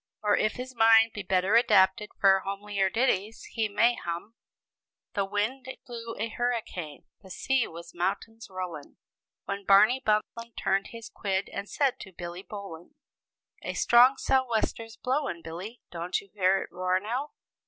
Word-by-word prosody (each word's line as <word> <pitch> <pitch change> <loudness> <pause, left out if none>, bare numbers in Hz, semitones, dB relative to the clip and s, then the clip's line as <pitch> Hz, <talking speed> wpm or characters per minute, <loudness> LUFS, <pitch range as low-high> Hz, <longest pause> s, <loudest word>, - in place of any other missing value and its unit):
Or 210 -1 +4
if 215 -1 +1
his 255 +1 -7
mind 225 -1 +6
be 210 - -5
better 190 +1 +1
adapted 210 -2 +4
for 195 -1 +5
homelier 200 0 -2
ditties, 220 -1 0
he 220 -2 -1
may 230 +4 +3
hum: 175 +1 -6 0.8
"The 200 -4 0
wind 210 +7 -2
it 260 - -9
blew 230 -1 -7
a 220 - -1
hurricane, 225 -10 -3 0.2
the 190 - -15
sea 265 +7 0
was 170 +1 -11
mountains 200 +6 -3
rollin', 180 -6 -7 0.5
When 200 0 -4
Barney 215 +7 +5
Buntlin' 225 +1 -1
turned 195 +1 0
his 230 -1 -9
quid, 195 -1 -2
and 200 - -5
said 275 -3 +1
to 190 - -10
Billy 175 0 -7
Bowlin': 200 - -9 0.7
'A - - -5
strong 250 +3 +6
sou'wester's 230 -4 0
blowin', 260 - -2
Billy; 185 +9 -8
don't 175 +1 -2
you 200 - -17
hear 190 -1 +2
it - - -13
roar 185 +1 0
now? 245 +9 -4
210 Hz, 155 wpm, -28 LUFS, 190-230 Hz, 0.8 s, mind